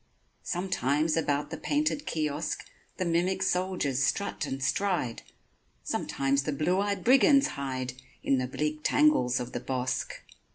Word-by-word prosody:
Sometimes 155 -4 0
about 145 -3 0
the - - -4
painted 295 0 0
kiosk 150 -1 -2 0.3
The 185 - -1
mimic 180 +3 +1
soldiers 180 -8 0
strut 160 0 -1
and 135 0 -4
stride, 140 -3 0 0.6
Sometimes 135 0 0
the 150 - -2
blue 155 +6 +1
eyed 200 -2 -1
brigands 275 +3 +5
hide 130 -2 -4 0.3
In 135 - +2
the 130 - -1
bleak 150 +4 -2
tangles 225 - +3
of 125 0 -5
the 120 - -3
bosk. 130 0 -3
150 Hz, 135 wpm, -29 LUFS, 135-185 Hz, 0.6 s, brigands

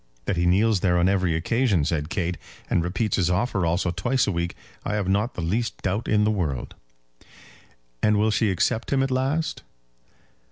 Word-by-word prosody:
"That 100 - 0
he 85 0 +1
kneels 100 +3 +3
there 90 -1 +2
on 85 +1 +3
every 95 -4 +1
occasion," 100 - +1
said 75 -1 -1
Kate, 90 -1 -1 0.4
"and 85 - +2
repeats 95 +5 -1
his 90 -3 +2
offer 95 -1 0
also 85 +1 0
twice 125 +8 +1
a - - 0
week, 85 -1 -2 0.3
I 105 - -2
have 100 -3 -1
not 100 +5 0
the - - -4
least 110 +8 -1
doubt 100 +4 -1
in 105 -1 +3
the 105 - +3
world." 80 - -2 1.3
"And 105 0 +3
will 110 +1 +2
she 110 0 +2
accept 100 +5 0
him 135 -1 +3
at 135 - -1
last?" 135 +5 -1
95 Hz, 190 wpm, -24 LUFS, 85-110 Hz, 1.3 s, kneels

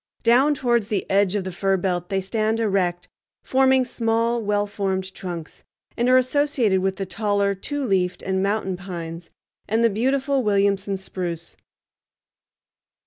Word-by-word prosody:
Down 260 +6 +4
towards 240 -5 +1
the 210 -3 -1
edge 200 0 +3
of 200 - 0
the 185 - -5
fir 195 +2 +1
belt 175 -1 -2
they 195 -1 0
stand 220 +3 -1
erect, 180 -5 0 0.4
forming 265 -1 +3
small, 230 0 0
well 205 -1 0
formed 190 -2 -3
trunks, 170 -4 -7 0.3
and 240 +1 +1
are 255 - +6
associated 255 -6 +2
with 190 0 0
the 195 - -4
taller 200 +1 0
two 285 +9 -4
leafed 185 -4 0
and 190 0 0
mountain 195 -2 -1
pines 170 -2 -7 0.4
and 225 +2 +1
the 230 - +4
beautiful 265 +5 +1
Williamson 200 -2 +1
spruce. 175 -3 -5
200 Hz, 145 wpm, -23 LUFS, 190-235 Hz, 0.4 s, are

